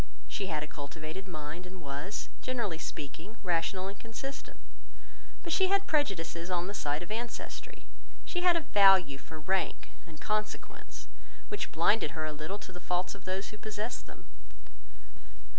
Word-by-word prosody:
She 195 - -1
had 155 -4 0
a - - -4
cultivated 155 +6 -6
mind, 155 +1 -5
and 185 0 -9
was, 145 +6 -3
generally 230 -10 0
speaking, 160 +9 -5
rational 180 +1 +2
and 200 +1 -6
consistent—but 270 +7 -8
she 380 +2 +6
had 395 +1 +4
prejudices 180 - +1
on 175 -1 +2
the 200 - -3
side 150 -4 0
of 175 - -8
ancestry; 235 +2 -4 0.4
she 355 - 0
had 355 -1 +7
a 335 - +3
value 190 - +7
for 160 +2 -8
rank 190 +5 +1 0.2
and 155 -2 -11
consequence, 215 0 -2 0.4
which 415 - -2
blinded 165 -1 +4
her 155 - 0
a 155 - -1
little 155 +6 -3
to 195 - -9
the 180 - -7
faults 180 +1 +1
of 200 -2 -12
those 190 +2 -1
who 210 - -9
possessed 215 +2 -3
them. - - -12
185 Hz, 160 wpm, -33 LUFS, 160-215 Hz, 0.4 s, had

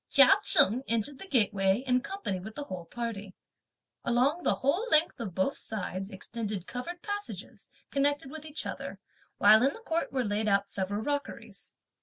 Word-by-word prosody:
Chia - - +7
Cheng 260 - +6
entered 230 +5 0
the 390 - -9
gateway 205 - +2
in 250 -1 +2
company 275 - -4
with 215 +4 -9
the 290 - -4
whole 185 -10 -7
party. 210 -2 -6 0.7
Along 260 +8 +1
the - - +2
whole 335 - 0
length 310 - +4
of 200 -7 -5
both 190 +9 0
sides 195 -3 -4
extended 205 -1 -5
covered 335 - -6
passages, 410 0 -6 0.2
connected 285 0 0
with 315 -1 -8
each 310 0 -4
other; - - -6 0.4
while 215 +2 +7
in 270 +2 +2
the - - -11
court 335 -6 -2
were 260 -1 0
laid 210 0 -1
out 200 0 +1
several 205 +2 -2
rockeries. 285 +1 -5
240 Hz, 170 wpm, -29 LUFS, 205-290 Hz, 0.7 s, Chia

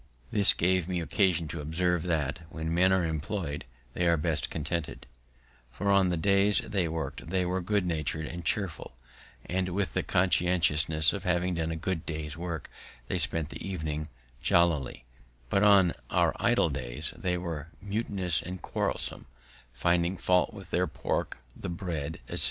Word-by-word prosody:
This 100 -2 +5
gave 90 0 +2
me 90 -1 -1
occasion 85 -1 +2
to 80 - -4
observe, 85 +3 +1
that, 80 -2 -1
when 80 0 -3
men 90 +2 +4
are 95 -2 +3
employ'd, 80 -1 -3 0.3
they 90 - +1
are 85 -1 +4
best 75 -1 -1
content'd; 80 +1 -3 0.7
for 100 +10 0
on 100 -2 +4
the 90 - 0
days 100 +3 +3
they 95 -5 0
worked 80 -1 -4
they 90 +1 0
were 90 +1 -1
good 100 +1 +1
natur'd 80 -2 -1
and 85 +2 -6
cheerful, 90 -12 -2 0.5
and, 90 +1 -1
with 100 +1 -1
the - - +1
consciousness 80 -4 +3
of 100 -2 -4
having 90 -1 +1
done 80 -1 -1
a 80 - -2
good 80 0 -2
day's 75 -1 -4
work, 85 -3 -4 0.4
they - - 0
spent 80 -3 +1
the - - -8
evening 80 -5 -3 0.3
jollily; 75 -8 +2 0.5
but 100 - +3
on 100 -4 +6 0.2
our - - +3
idle - - +3
days - - -4
they 90 -1 -1
were 85 -4 -4
mutinous 100 -4 -1
and 90 +1 -7
quarrelsome, - - -2 0.4
finding 85 +7 +1
fault 90 0 +3
with - - -11
their - - +2
pork, - - -2 0.2
the - - -6
bread, 85 -4 -4
etc. - - -2
85 Hz, 165 wpm, -29 LUFS, 80-95 Hz, 0.7 s, on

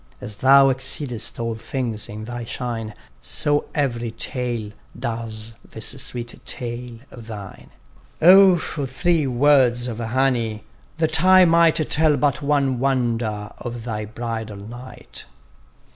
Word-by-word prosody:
As 105 - -7
thou 135 +1 +6
exceedest 130 -3 -1
all 115 0 -2
things 115 -1 -4
in 105 +1 -7
thy 120 +1 -6
shine, 115 -2 -5 0.3
So 145 - +3
every 120 -5 -1
tale, 120 -2 -4 0.3
does 115 -1 -5
this 110 - -1
sweet 120 -1 -6
tale 120 0 -6
of 115 -3 -12
thine. 105 -4 -9 0.5
O 185 +1 +7
for 145 -4 -4
three 155 +3 0
words 125 -2 +3
of 115 -2 -5
honey, 115 -2 0 0.3
that 160 0 0
I 185 0 +7
might 165 -1 +4 0.2
Tell 155 -1 +3
but 140 -1 0
one 140 -3 +1
wonder 115 -5 -1
of 120 -1 -6
thy 110 -2 -4
bridal 110 -1 -5
night! 120 +5 -10
120 Hz, 130 wpm, -22 LUFS, 115-140 Hz, 0.5 s, O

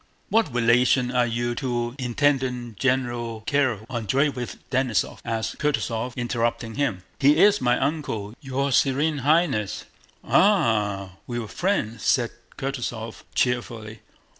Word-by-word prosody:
"What 220 -9 +2
relation 125 +1 +3
are 125 -1 +2
you 120 +1 -1
to 120 -2 -2
Intendant 125 -3 0
General 120 -4 -1
Kiríl 130 -7 +1
Andréevich 125 +2 -1
Denísov?" 125 -6 0
asked 115 -1 -3
Kutúzov, 125 -5 -1
interrupting 120 -2 -1
him. 115 -10 -1 0.2
"He 145 +2 +5
is 205 +4 +5
my 125 0 +3
uncle, 130 -8 -2
your 135 0 -1
Sewene 145 +3 +2
Highness." 145 - +1 0.4
"Ah, 105 - +2
we 120 - -3
were 115 -2 -4
friends," 115 - -1
said 120 -3 +2 0.3
Kutúzov 120 -4 -4
cheerfully. 115 -3 -1
125 Hz, 115 wpm, -24 LUFS, 115-135 Hz, 0.4 s, He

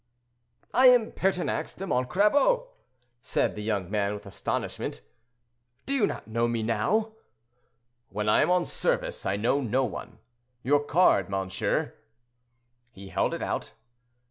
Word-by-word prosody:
"I 255 +2 +6
am 245 -3 +5
Pertinax 185 -2 -1
de 195 - -5
Montcrabeau," 210 - +2 0.5
replied - - 0
the 105 - -5
young 100 -4 -2
man, 105 -1 0
with 105 +1 -10
astonishment. 60 -9 -4 0.8
"Do 275 - -2
you 255 -7 +3
not - - -6
know 115 +1 0
me 115 -1 -1
now?" 215 - 0 1.0
"When 105 +1 -3
I 105 - +4
am 155 - +2
on 180 -1 +3
service, - - -2
I 95 - +1
know 120 +7 +1
no 130 +2 +1
one. 115 - -7 0.5
Your 145 +2 +3
card, 145 - +3
monsieur?" 95 0 -1 1.0
He 100 -4 -12
held - - 0
it - - -5
out. - - -3
125 Hz, 140 wpm, -27 LUFS, -, 1.0 s, I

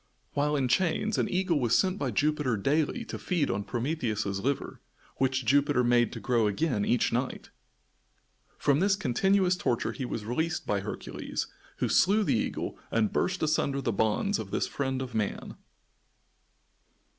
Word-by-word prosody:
While 150 +1 +1
in 135 -3 +1
chains 185 - +1
an - - +1
eagle 180 -4 +1
was 120 -3 +3
sent 190 +1 +1
by - - -1
Jupiter 150 -6 +1
daily 150 - 0
to - - -6
feed 170 -6 0
on 100 - -2
Prometheus's 115 -6 -2
liver, 135 +6 -2 0.4
which 130 -1 0
Jupiter 140 +1 +3
made 120 -1 +3
to - - -6
grow 115 -3 +2
again 105 0 0
each 120 +2 +1
night. 125 +2 -3 1.1
From 140 -1 +2
this 195 +2 +3
continuous 190 +4 +2
torture 120 -9 -1
he 135 - -5
was 110 -3 -4
released 160 +9 -1
by 105 - 0
Hercules, 100 - -4 0.3
who - - 0
slew 210 +3 +4
the - - +1
eagle 110 - -2
and 110 -2 +1
burst 185 -2 0
asunder 150 -3 +1
the 120 -4 -1
bonds 110 - +1
of - - -5
this - - 0
friend 130 -1 -2
of 125 -2 -8
man. 105 -3 -3
135 Hz, 160 wpm, -29 LUFS, 120-165 Hz, 1.1 s, slew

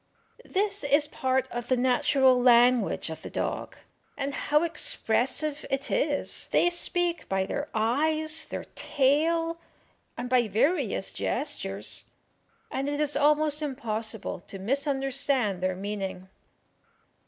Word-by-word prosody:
This 400 0 0
is 285 +1 +3
part 260 -2 0
of 240 0 -5
the 255 - +2
natural 255 +1 +3
language 245 -7 +4
of 160 - -7
the - - -8
dog, - - -3 0.4
and 280 0 -3
how 300 +3 +1
expressive 305 - 0
it 270 +1 -1
is! 290 -1 0
They 350 - +4
speak 345 0 0
by 190 0 +1
their 285 +9 -4
eyes, 310 +8 +1
their - - -5
tail, 325 +4 +1 0.6
and 245 - -4
by 245 -2 +3
various 255 - 0
gestures, - - -2 0.7
and 275 +2 -2
it 290 0 -2
is 295 -1 +1
almost 300 +1 +3
impossible 225 -8 -3
to 195 - -7
misunderstand 270 - 0
their 185 0 0
meaning. 195 -1 -5
270 Hz, 120 wpm, -27 LUFS, 235-305 Hz, 0.7 s, language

